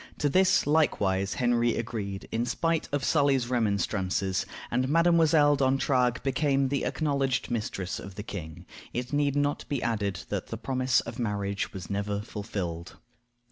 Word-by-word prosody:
To 145 - +1
this 185 +4 +4
likewise 100 -11 +1
Henry 120 -1 +2
agreed, 105 -4 -4
in 115 - 0
spite 165 +2 0
of 145 -2 -1
Sully's 135 -4 +2
remonstrances; 100 -4 0 0.2
and 125 +2 +1
Mdlle. 160 -2 +4
D'Entragues 130 -2 +2
became 135 0 +1
the 140 0 -1
acknowledged 140 -5 0
mistress 105 -5 -3
of 95 -1 -9
the 105 - -6
king. 85 -4 -7 0.3
It 125 +3 -4
need 145 -1 +2
not 145 0 0
be 140 -4 -1
added 105 -6 -1
that - - -3
the - - -5
promise 130 -1 +1
of 115 +2 -8
marriage 100 -3 -2
was 90 -3 -7
never 100 0 -1
fulfilled. 95 -6 -5
120 Hz, 145 wpm, -28 LUFS, 100-140 Hz, 0.3 s, this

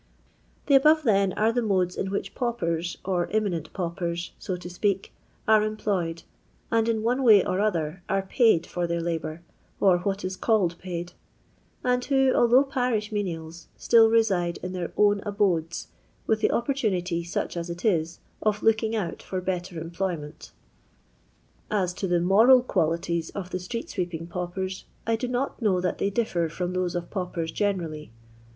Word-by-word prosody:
The 280 - +2
above, 305 +3 +6
then, 200 -6 +3
are 220 +2 +2
the 245 +1 0
modes 185 -5 +1
in 195 - -2
which 200 - -3
paupers, 175 -8 -2
or 180 -2 0
inmiinent 195 -7 -1
paupers, 170 -1 -3
so 185 - -3
to 175 - -9
speak, 195 +2 -1 0.3
ore 215 -1 +6
employed, 200 -6 -2 0.5
and 230 0 +2
in 220 -1 0
one 245 +4 +1
way 215 -6 +6
or 185 - -1
other 175 -5 -1
are 195 0 +1 0.2
liald 220 -9 +5
for 175 -1 -2
their 170 0 -1
liJiour, 165 -1 -3 0.4
or 185 -3 +4
what 195 +1 -2
is 185 0 -3
called 185 -6 +1
paid, 175 -1 -5 0.7
and 250 0 +1
who, 270 -2 +3
although 240 +3 +5
parish 245 -6 -1
menials, 170 -5 -4
still 225 -1 +5
reside 195 -7 +2
in 180 0 -4
their 180 -2 -4
own 205 -1 +4
abodes, 190 -6 -1 0.4
with 220 - +1
the 220 - +2
opportunity, 190 -10 0
such 170 - -3
as 170 0 -4
it 170 +4 -6
is, 170 -5 0 0.2
of 210 -1 0
"looking 225 0 +2
out" 200 -6 -3
for 185 - -4
better 180 -1 -3
employment 165 -2 -5 1.2
As 190 -4 0
to 190 - -3
the 175 -1 +2
moral 225 +8 +6
qwUititi 170 -4 -1
qf 185 -3 -5
the 185 - -2
ttreU 230 +6 -5 0.2
neeeping 165 -1 -6
pauptrt 185 +2 -4 0.2
I 230 - +2
do 250 +3 -3
not 250 +2 -2
know 195 -5 +2
that 180 0 -2
they 200 - +1
differ 190 -6 0
from 180 +2 -3
those 185 -1 -1
of 175 -1 -4
paupers 180 -4 -3
generally. 165 - -2
185 Hz, 165 wpm, -26 LUFS, 170-220 Hz, 1.2 s, above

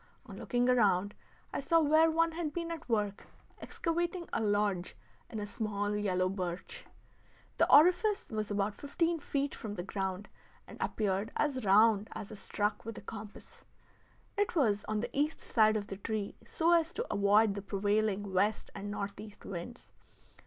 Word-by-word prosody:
On - - -10
looking 245 0 0
around 205 -5 +3 0.4
I - - -1
saw 330 +4 +3
where 315 +1 +5
one 330 +1 +2
had 320 -2 -3
been 335 -1 -3
at 325 -6 -7
work 210 -3 -1 0.3
excavating 345 +1 -2
a - - +1
lodge 205 -4 0 0.3
in 220 - -5
a 205 - -3
small 205 -1 -2
yellow 185 -3 +1
birch. 185 - -5 0.7
The - - +3
orifice 360 - +5
was 215 -1 -2
about 205 0 0
fifteen 330 - -1
feet 280 -1 -2
from 210 -2 -6
the 175 - -4
ground, 190 +1 -3 0.4
and - - -12
appeared 205 0 -1
as 275 -4 0
round 210 +1 +5
as 205 - -7
if 210 - -9
struck 205 +1 -2
with 225 0 -7
a - - -7
compass. 210 0 -10 0.7
It 410 -2 0
was 210 -10 +2
on 215 -1 -1
the 240 +1 -5
east 295 +3 0
side 215 -1 +3
of 205 - -3
the 195 - -7
tree, 210 0 -3
so 335 +1 +2
as 335 0 +2
to 470 - -2
avoid 205 +1 +4
the 200 - -5
prevailing 205 0 0
west 205 +3 +1
and 200 0 -6
northeast 205 +1 -6
winds. 195 +6 -8
215 Hz, 165 wpm, -32 LUFS, 200-290 Hz, 0.7 s, where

